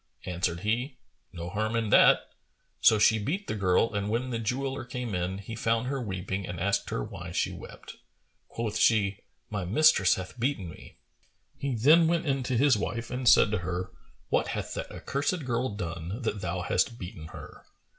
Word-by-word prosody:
Answered 85 Hz, -1 st, -2 dB
he, 120 Hz, +6 st, -1 dB, 0.3 s
"No 85 Hz, -1 st, -6 dB
harm 110 Hz, +3 st, -1 dB
in 115 Hz, -2 st, 0 dB
that." -, -, +7 dB, 0.6 s
So 110 Hz, -, +6 dB
she 110 Hz, +1 st, +4 dB
beat 170 Hz, -, -2 dB
the -, -, -3 dB
girl 100 Hz, +2 st, +2 dB
and 100 Hz, 0 st, -1 dB
when 120 Hz, +4 st, -1 dB
the 115 Hz, -, -2 dB
jeweller 135 Hz, +5 st, -2 dB
came 125 Hz, -2 st, -5 dB
in, 90 Hz, +1 st, -2 dB
he 100 Hz, +3 st, -7 dB
found 115 Hz, +1 st, 0 dB
her 135 Hz, +1 st, -2 dB
weeping 95 Hz, -2 st, -4 dB
and 90 Hz, -1 st, -5 dB
asked 100 Hz, +3 st, 0 dB
her -, -, -2 dB
why -, -, -7 dB
she -, -, 0 dB
wept. -, -, -11 dB, 0.5 s
Quoth 110 Hz, -2 st, -3 dB
she, 100 Hz, -3 st, +3 dB, 0.3 s
"My 100 Hz, -3 st, -2 dB
mistress 100 Hz, -, +4 dB
hath 95 Hz, +6 st, -8 dB
beaten 115 Hz, -7 st, -1 dB
me." 80 Hz, -, -12 dB, 0.6 s
He 140 Hz, -3 st, -2 dB
then 155 Hz, +9 st, +6 dB
went 170 Hz, 0 st, +1 dB
in 135 Hz, -2 st, 0 dB
to 125 Hz, -1 st, -1 dB
his 140 Hz, 0 st, +5 dB
wife 115 Hz, +3 st, -3 dB
and 125 Hz, -1 st, +2 dB
said 105 Hz, -, +6 dB
to 110 Hz, -, 0 dB
her, 90 Hz, +1 st, -4 dB, 0.4 s
"What -, -, +2 dB
hath -, -, -4 dB
that -, -, -5 dB
accursed 145 Hz, +3 st, -2 dB
girl 125 Hz, +1 st, 0 dB
done, 90 Hz, +4 st, -5 dB
that 105 Hz, -3 st, -2 dB
thou 90 Hz, 0 st, -2 dB
hast 115 Hz, +6 st, 0 dB
beaten 85 Hz, -5 st, -8 dB
her?" -, -, -11 dB
110 Hz, 185 wpm, -28 LUFS, 95-125 Hz, 0.6 s, that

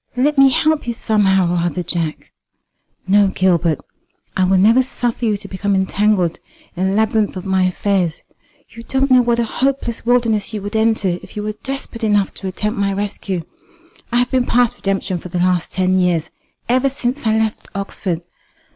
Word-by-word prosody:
"Let 290 Hz, +4 st, +2 dB
me 275 Hz, -1 st, +6 dB
help 310 Hz, +1 st, +1 dB
you 235 Hz, -, -1 dB
somehow 195 Hz, -6 st, +2 dB
or -, -, +1 dB
other, 175 Hz, +1 st, -1 dB
Jack." 165 Hz, -2 st, -3 dB, 0.8 s
"No, 200 Hz, +1 st, +5 dB
Gilbert; 175 Hz, -4 st, +1 dB, 0.6 s
I 185 Hz, -, +2 dB
will 190 Hz, +1 st, +3 dB
never 225 Hz, +7 st, +5 dB
suffer 245 Hz, -2 st, -2 dB
you 210 Hz, -2 st, +1 dB
to -, -, -10 dB
become 200 Hz, +1 st, -1 dB
entangled 190 Hz, -2 st, +1 dB, 0.4 s
in 185 Hz, +2 st, 0 dB
the 195 Hz, -, -1 dB
labyrinth 220 Hz, -2 st, +1 dB
of 185 Hz, -, -7 dB
my 190 Hz, -1 st, +2 dB
affairs. 185 Hz, -2 st, 0 dB, 0.5 s
You 230 Hz, -, -11 dB
don't 265 Hz, +3 st, 0 dB
know 255 Hz, -1 st, +7 dB
what 235 Hz, -1 st, +1 dB
a 235 Hz, -, +2 dB
hopeless 255 Hz, 0 st, -1 dB
wilderness 230 Hz, -3 st, +1 dB
you 210 Hz, -, -3 dB
would 205 Hz, +2 st, -5 dB
enter 220 Hz, -5 st, +2 dB
if -, -, -14 dB
you 210 Hz, -, -3 dB
were 215 Hz, 0 st, -3 dB
desperate 270 Hz, -3 st, -5 dB
enough 205 Hz, -2 st, +2 dB
to 195 Hz, -, -6 dB
attempt 210 Hz, +3 st, -3 dB
my 200 Hz, 0 st, +1 dB
rescue. 195 Hz, -3 st, -3 dB, 0.7 s
I 240 Hz, -, +1 dB
have 245 Hz, 0 st, +1 dB
been 255 Hz, -1 st, +1 dB
past 245 Hz, 0 st, +2 dB
redemption 195 Hz, -4 st, -2 dB
for 180 Hz, -, -9 dB
the 180 Hz, -, -3 dB
last 180 Hz, -1 st, +1 dB
ten 185 Hz, 0 st, +1 dB
years, 175 Hz, -3 st, 0 dB, 0.4 s
ever 255 Hz, +3 st, +2 dB
since 255 Hz, -1 st, -2 dB
I 220 Hz, 0 st, +3 dB
left 220 Hz, -1 st, -1 dB
Oxford. 190 Hz, -3 st, -3 dB
205 Hz, 185 wpm, -18 LUFS, 185-235 Hz, 0.8 s, know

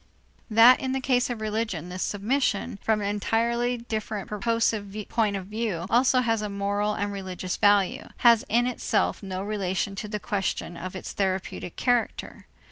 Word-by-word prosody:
That 230 Hz, +3 st, +7 dB
in 260 Hz, 0 st, -2 dB
the 265 Hz, -, 0 dB
case 255 Hz, -2 st, +1 dB
of 235 Hz, -3 st, -4 dB
religion 215 Hz, -6 st, -2 dB
this 180 Hz, +1 st, -5 dB
submission, 205 Hz, -1 st, -1 dB
from 220 Hz, -1 st, +1 dB
an 200 Hz, -, -1 dB
entirely 235 Hz, +4 st, 0 dB
different 215 Hz, -3 st, -4 dB
purposive 215 Hz, -2 st, 0 dB
point 215 Hz, -3 st, +1 dB
of 190 Hz, -2 st, -4 dB
view, 210 Hz, -4 st, -3 dB
also 250 Hz, +1 st, +4 dB
has 225 Hz, -3 st, +1 dB
a 210 Hz, -, -3 dB
moral 205 Hz, +1 st, -1 dB
and 205 Hz, 0 st, -2 dB
religious 185 Hz, -2 st, -4 dB
value, 205 Hz, -2 st, +3 dB, 0.2 s
has 235 Hz, -2 st, +7 dB
in 240 Hz, +2 st, +3 dB
itself 250 Hz, -1 st, 0 dB
no 190 Hz, -1 st, -4 dB
relation 200 Hz, -1 st, -2 dB
to 210 Hz, -, -4 dB
the 210 Hz, 0 st, -4 dB
question 195 Hz, -3 st, -2 dB
of 185 Hz, +2 st, -7 dB
its 185 Hz, -, -6 dB
therapeutic 190 Hz, -2 st, -2 dB
character. 245 Hz, -2 st, -1 dB
210 Hz, 165 wpm, -26 LUFS, 195-230 Hz, 0.2 s, That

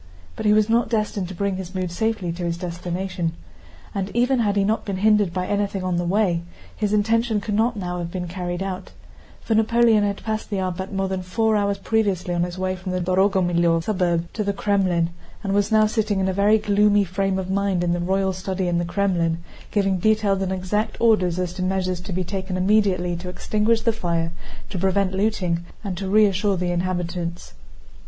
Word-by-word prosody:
But -, -, -2 dB
he -, -, +6 dB
was 215 Hz, 0 st, +4 dB
not 230 Hz, 0 st, +2 dB
destined 210 Hz, -4 st, -1 dB
to 190 Hz, -, -8 dB
bring 200 Hz, 0 st, -1 dB
his 190 Hz, 0 st, -7 dB
mood 185 Hz, -2 st, -2 dB
safely 215 Hz, -1 st, -1 dB
to 175 Hz, +1 st, -5 dB
his 170 Hz, -1 st, -1 dB
destination. 175 Hz, 0 st, -3 dB, 0.6 s
And 195 Hz, -1 st, -2 dB
even 250 Hz, +2 st, +3 dB
had 205 Hz, -3 st, +1 dB
he 200 Hz, -, +3 dB
not 215 Hz, +3 st, 0 dB
been 195 Hz, -2 st, -3 dB
hindered 210 Hz, -2 st, +3 dB
by 180 Hz, +1 st, -2 dB
anything 200 Hz, -1 st, -1 dB
on 180 Hz, -1 st, 0 dB
the 175 Hz, -, 0 dB
way, 180 Hz, -2 st, +1 dB, 0.3 s
his 210 Hz, -2 st, -1 dB
intention 225 Hz, +1 st, +2 dB
could 210 Hz, +1 st, -4 dB
not 225 Hz, +2 st, +1 dB
now 180 Hz, -2 st, -3 dB
have 170 Hz, -1 st, -4 dB
been 180 Hz, 0 st, -4 dB
carried 175 Hz, +1 st, -3 dB
out, 190 Hz, -1 st, -5 dB, 0.5 s
for 225 Hz, -, -1 dB
Napoleon 225 Hz, 0 st, +4 dB
had 200 Hz, -1 st, -2 dB
passed 220 Hz, 0 st, -3 dB
the 205 Hz, -, -2 dB
Arbát 190 Hz, 0 st, -3 dB
more 195 Hz, -1 st, -1 dB
than 190 Hz, -1 st, -2 dB
four 220 Hz, +4 st, +1 dB
hours 200 Hz, -1 st, +1 dB
previously 200 Hz, -5 st, 0 dB
on 175 Hz, -, 0 dB
his 175 Hz, +1 st, -2 dB
way 185 Hz, 0 st, -1 dB
from 185 Hz, 0 st, -5 dB
the 185 Hz, -, 0 dB
Dorogomílov 175 Hz, -2 st, +2 dB
suburb 175 Hz, -4 st, 0 dB
to 215 Hz, -, -1 dB
the 200 Hz, 0 st, 0 dB
Krémlin, 185 Hz, -5 st, +1 dB, 0.3 s
and 195 Hz, -1 st, -1 dB
was 205 Hz, +2 st, +1 dB
now 215 Hz, 0 st, +5 dB
sitting 215 Hz, -2 st, 0 dB
in 190 Hz, -, +1 dB
a 190 Hz, -, 0 dB
very 205 Hz, +3 st, +4 dB
gloomy 205 Hz, -1 st, +3 dB
frame 195 Hz, +1 st, -1 dB
of 190 Hz, 0 st, -3 dB
mind 195 Hz, -2 st, +1 dB
in 175 Hz, 0 st, +1 dB
a -, -, -2 dB
royal 190 Hz, +2 st, +1 dB
study 185 Hz, 0 st, -2 dB
in 175 Hz, -1 st, +1 dB
the 175 Hz, -, -1 dB
Krémlin, 170 Hz, -3 st, 0 dB, 0.3 s
giving 195 Hz, -3 st, +1 dB
detailed 210 Hz, -1 st, +2 dB
and 190 Hz, -1 st, -1 dB
exact 190 Hz, +3 st, -1 dB
orders 185 Hz, -7 st, +3 dB
as 180 Hz, -1 st, -2 dB
to 185 Hz, -, -5 dB
measures 185 Hz, -1 st, -1 dB
to 190 Hz, +2 st, -7 dB
be 185 Hz, +1 st, -1 dB
taken 185 Hz, 0 st, -4 dB
immediately 185 Hz, -2 st, +2 dB
to 180 Hz, +1 st, -6 dB
extinguish 215 Hz, +5 st, +1 dB
the 230 Hz, 0 st, +2 dB
fire, 170 Hz, -6 st, -1 dB, 0.4 s
to 185 Hz, -, -3 dB
prevent 190 Hz, +1 st, +1 dB
looting, 190 Hz, -4 st, 0 dB, 0.2 s
and 195 Hz, -4 st, -3 dB
to 195 Hz, -1 st, -3 dB
reassure 205 Hz, -1 st, +3 dB
the 180 Hz, 0 st, -1 dB
inhabitants. 175 Hz, -1 st, -3 dB
190 Hz, 205 wpm, -23 LUFS, 180-210 Hz, 0.6 s, he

